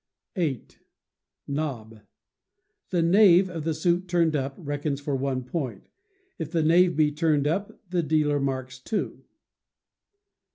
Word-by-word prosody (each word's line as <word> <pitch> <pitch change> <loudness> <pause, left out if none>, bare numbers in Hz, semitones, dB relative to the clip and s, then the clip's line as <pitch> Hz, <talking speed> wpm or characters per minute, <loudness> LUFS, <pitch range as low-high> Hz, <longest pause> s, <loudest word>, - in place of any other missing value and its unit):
viii. 155 - -1 0.8
Nob. 125 -7 -4 0.9
The 175 -2 +1
knave 185 0 +5
of 165 -3 -5
the 160 -1 0
suit 175 +3 0
turned 170 -3 +2
up 135 -1 -2
reckons 145 -2 -3
for 145 -1 -2
one 130 -1 -2
point; 125 - -4 0.5
if 160 0 -5
a 165 - +3
knave 175 +2 +4
be 150 -1 +3
turned 150 -2 +1
up, 190 +7 -2
the 175 0 0
dealer 150 -2 +1
marks 130 -2 -3
two. 210 +10 -4
155 Hz, 130 wpm, -26 LUFS, 140-170 Hz, 0.9 s, knave